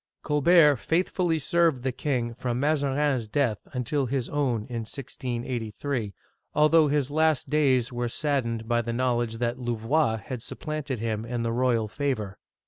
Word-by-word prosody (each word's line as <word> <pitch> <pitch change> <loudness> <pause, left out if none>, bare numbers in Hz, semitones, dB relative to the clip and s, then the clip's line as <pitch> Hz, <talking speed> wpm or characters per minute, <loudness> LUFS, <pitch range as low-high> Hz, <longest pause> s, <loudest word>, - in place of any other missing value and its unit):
Colbert 150 0 +5
faithfully 170 +3 0
served 160 -3 +2
the 130 - 0
king 125 -2 -2
from 120 +1 -3
Mazarin's 140 -4 +1
death 115 -3 0
until 130 +2 -1
his 130 -1 -2
own 135 -6 0
in 120 -1 -4
1683, 120 -2 -4 0.4
although 155 +1 +5
his 145 -1 0
last 155 -3 +1
days 130 -5 +2
were 120 0 -2
saddened 115 -5 -1
by 120 0 +2
the 115 0 -4
knowledge 120 -2 0
that 120 +1 -1
Louvois 120 +1 +1
had 115 +3 -6
supplanted 150 0 -4
him 110 -1 -2
in 120 0 -3
the 115 - -1
royal 120 -2 +1
favor. 110 -6 -3
130 Hz, 145 wpm, -26 LUFS, 115-145 Hz, 0.4 s, Colbert